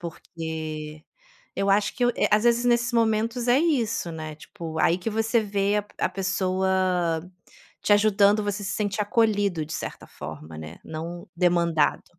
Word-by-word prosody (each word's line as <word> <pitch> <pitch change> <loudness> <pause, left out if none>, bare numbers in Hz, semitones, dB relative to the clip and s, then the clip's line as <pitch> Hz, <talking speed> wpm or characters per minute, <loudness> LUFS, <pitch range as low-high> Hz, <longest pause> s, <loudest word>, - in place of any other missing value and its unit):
Porque 155 -2 -6 0.5
eu 195 - 0
acho 200 +1 +2
que 255 - -1
eu - - +4
eh, - - +2
às 210 +1 +4
vezes 240 0 +3
nesses 240 0 +2
momentos, 230 +1 +1
é 245 +1 +5
isso, 240 - 0
né, 155 -1 -6
tipo, 160 +1 -8
aí 170 +2 +3
que 190 - -3
você 225 +2 +1
vê 205 0 0
a - - +1
p 205 - -23
a - - +1
pessoa 185 -2 0 0.5
te 205 - +4
ajudando, 205 0 +4
você 205 0 -2
se 190 -1 -3
sente 205 0 -2
acolhido, 205 -6 +1
de 155 - -10
certa - - -6
forma, 80 +1 -9
né, 80 +1 -9
não 165 +2 -6
demandado. 170 -3 +2
195 Hz, 165 wpm, -25 LUFS, 165-215 Hz, 0.5 s, é